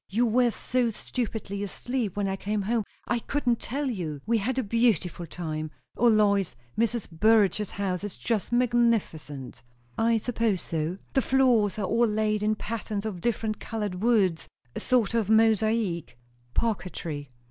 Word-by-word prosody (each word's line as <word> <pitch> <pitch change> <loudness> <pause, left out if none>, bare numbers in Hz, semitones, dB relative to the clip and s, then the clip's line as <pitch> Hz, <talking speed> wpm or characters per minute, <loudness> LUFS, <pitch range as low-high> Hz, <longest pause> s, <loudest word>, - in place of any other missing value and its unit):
You 230 +5 +2
were 240 +2 +3
so 245 +1 0
stupidly 220 -3 -4
asleep 225 +1 -3
when 200 -1 +1
I 190 - -1
came 205 +1 -2
home, 220 +1 0 0.2
I 240 - +1
couldn't 245 -2 0
tell 280 +4 -3
you. 170 - -3
We 230 +1 +2
had 250 +6 -1
a 260 - +1
beautiful 200 -6 +1
time! 155 -2 -4 0.3
O 240 - +3
Lois, 200 - +3 0.2
Mrs. 230 0 0
Burrage's 210 +2 +3
house 190 -2 -2
is 205 -2 -5
just 225 -3 -1
magnificent!" 230 - 0 0.4
"I 230 0 +3
suppose 225 -4 0
so." 165 +2 -2 0.2
"The 270 - +3
floors 245 -7 +3
are 205 - -1
all 230 +4 +3
laid 215 0 0
in 215 +1 +2
patterns 215 -1 -4
of 195 -5 -4
different 220 -1 -1
coloured 210 -5 -4
woods 205 -8 +2 0.3
a - - -2
sort 240 -4 +2
of 225 -4 +1
mosaic 220 - +2 0.2
" 120 0 -35
"Parquetry." 170 - -2
215 Hz, 160 wpm, -27 LUFS, 190-235 Hz, 0.4 s, were